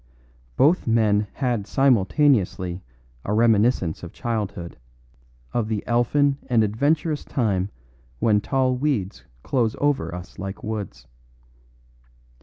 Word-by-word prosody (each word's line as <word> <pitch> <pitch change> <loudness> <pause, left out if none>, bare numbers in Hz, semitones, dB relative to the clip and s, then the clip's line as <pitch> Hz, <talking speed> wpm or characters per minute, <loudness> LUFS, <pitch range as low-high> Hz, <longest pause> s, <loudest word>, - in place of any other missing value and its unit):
Both 155 +4 +3
men 105 -2 +2
had 120 -7 -1
simultaneously 110 - +2 0.4
a 105 - -2
reminiscence 110 -6 +2
of 85 - -8
childhood, 100 - -4 0.7
of 120 -3 0
the 110 -2 -3
elfin 135 +4 +2
and 120 -4 +3
adventurous 145 - 0
time 100 -6 -1 0.5
when 105 - +2
tall 130 +2 +1
weeds 125 -8 -2 0.2
close 115 -5 0
over 145 -10 0
us 90 0 -10
like 95 +1 -6
woods. 110 -3 -5
115 Hz, 105 wpm, -23 LUFS, 100-135 Hz, 0.7 s, Both